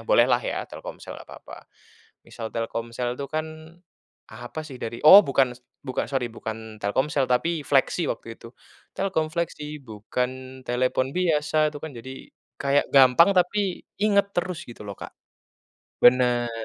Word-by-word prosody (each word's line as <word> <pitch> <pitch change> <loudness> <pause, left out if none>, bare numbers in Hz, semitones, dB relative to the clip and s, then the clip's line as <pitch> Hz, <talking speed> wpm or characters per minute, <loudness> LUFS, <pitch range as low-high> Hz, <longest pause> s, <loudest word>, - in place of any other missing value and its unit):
bolehlah 120 +1 +4
ya - - -3
Telkomsel - - -9
nggak - - -14
papa. - - -12 0.6
Misal 110 -1 -7
Telkomsel 115 +1 -3
tuh 140 - -4
kan, 155 0 -2 0.8
apa 120 +7 -7
sih 135 -4 -9
dari 115 +1 -5
oh, 195 +7 +11
bukan 135 -2 +2
s - - -22 0.2
bukan 130 -1 -2
sorry 130 -3 -1
bukan 110 -1 -7
Telkomsel 135 +8 +1
tapi 155 +7 +1
Flexi 140 +5 +2
waktu 115 0 -6
itu. 115 - -11 0.5
Telkom 185 -5 0
Flexi, 150 -3 -4
Bukan 130 +4 -5
telepon 130 +1 0
biasa 155 -3 +2
itu 150 - -8
kan. 160 -2 -6
Jadi 130 +3 -10 0.3
kayak 140 +1 +2
gampang 135 +7 +7
tapi 185 +1 +1 0.2
inget 200 -1 +2
terus 175 -1 -2
gitu 120 - -12
loh, 100 -1 -7
Kak. - - -9 0.9
Bener. 120 -1 +4
130 Hz, 145 wpm, -25 LUFS, 120-155 Hz, 0.9 s, oh